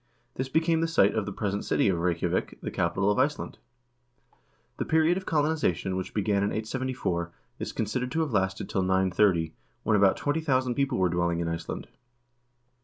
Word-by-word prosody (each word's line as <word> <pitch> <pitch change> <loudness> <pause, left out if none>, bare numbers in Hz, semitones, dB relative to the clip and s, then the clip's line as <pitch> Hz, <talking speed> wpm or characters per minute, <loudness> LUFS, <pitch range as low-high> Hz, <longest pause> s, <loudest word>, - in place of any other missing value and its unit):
This 130 +1 -3
became 160 +2 +2
the 165 - +1
site 125 -12 +4
of 110 -2 -1
the - - -3
present 100 0 -2
city - - +2
of 90 -3 +1
Reykjavik, 85 -1 -1
the - - -5
capital 95 +4 +1
of 105 - 0
Iceland. 145 +3 -1 1.2
The - - -1
period 160 +2 +3
of 190 0 -5
colonization, 145 - +1
which 95 0 -5
began 100 -1 +1
in 100 - +1
874, 110 -7 -2 0.3
is - - -4
considered 120 +4 -2
to 160 - +1
have 150 -6 -2
lasted 95 -1 0
till 95 - -1
930, 95 -3 +2 0.3
when 110 - +2
about 100 -2 +4
20,000 140 -4 0
people 140 -1 0
were 95 - +3
dwelling 85 -1 0
in 85 - -1
Iceland. 85 0 -4
105 Hz, 175 wpm, -27 LUFS, 95-135 Hz, 1.2 s, site